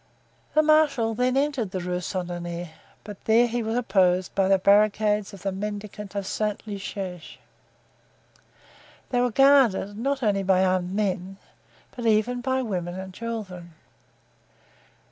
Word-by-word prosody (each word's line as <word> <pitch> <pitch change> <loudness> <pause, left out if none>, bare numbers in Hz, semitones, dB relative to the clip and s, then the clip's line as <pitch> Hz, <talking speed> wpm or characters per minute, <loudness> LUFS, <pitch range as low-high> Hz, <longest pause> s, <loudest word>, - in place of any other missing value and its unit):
The 310 - +5
marshal 300 -7 +3
then 250 +3 +1
entered 275 -7 0
the 185 0 -4
Rue 180 0 -2
Saint 180 0 -4
Honore, 175 -1 -5 0.3
but 205 -2 -10
there 225 +2 +5
he 240 0 -2
was 225 0 -2
opposed 185 -5 +2
by 195 -1 +2
the 195 0 +4
barricades 210 +1 +3
of 195 -2 -12
the 195 - -1
mendicant 205 0 -6
of 200 -1 -2
Saint 210 +1 -2
Eustache. 195 -4 -6 1.7
They 245 -1 +2
were 250 - +2
guarded, 255 -6 +4
not 270 +4 -2
only 205 -3 +2
by 190 -1 +3
armed 185 0 0
men, 195 -2 -2 0.6
but 240 -2 -3
even 225 +3 +2
by 260 +1 0
women 180 -5 -4
and 190 0 -8
children. 190 -7 -7
205 Hz, 145 wpm, -25 LUFS, 185-230 Hz, 1.7 s, The